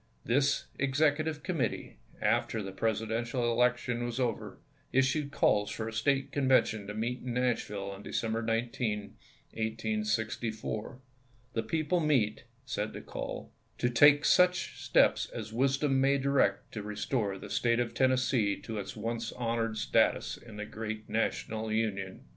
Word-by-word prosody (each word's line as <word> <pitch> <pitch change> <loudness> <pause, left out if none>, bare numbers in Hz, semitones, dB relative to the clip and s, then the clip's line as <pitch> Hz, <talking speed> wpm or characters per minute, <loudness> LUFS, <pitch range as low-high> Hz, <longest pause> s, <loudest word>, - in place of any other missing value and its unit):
This 140 +3 +2
executive 150 +2 +1
committee, 170 -8 -2 0.3
after 110 -2 +1
the 95 - -5
Presidential 115 +4 -1
election 125 0 +1
was 120 +1 -3
over, 120 -3 -2 0.3
issued 135 +2 +2
calls 105 -6 +2
for 110 - -4
a 115 - -5
State 135 +5 +1
Conven 135 -2 +4
tion 105 -2 -5
to 105 - -5
meet 120 +3 -2
in 125 -1 -3
Nashville 105 -5 -1
on 100 0 -9
December 115 +1 -2
19, 115 -2 -1 0.4
1864. 110 +1 -2 0.3
" 125 0 -34
The 115 - 0
people 155 +8 0
meet," 125 -9 +1 0.2
said 110 -4 -3
the - - -7
call, - - -6
" - - -39
to 120 - +1
take 145 +4 +6
such 180 0 +3
steps - - +3
as 110 -1 -6
wisdom 135 +2 +2
may 140 +1 +4
direct 135 -8 +1
to 110 - -5
restore 105 0 -2
the - - -9
State 115 0 +2
of 120 -2 -1
Tennessee 130 -5 +2
to 110 -2 -5
its 100 - -6
once 115 +1 -3
honored 115 -2 -1
status 105 - +2
in 115 -3 -13
the 105 - -4
gi 110 0 -4
eat 110 0 -17
National 110 0 -1
Union. 100 -4 -2
115 Hz, 155 wpm, -31 LUFS, 110-130 Hz, 0.4 s, take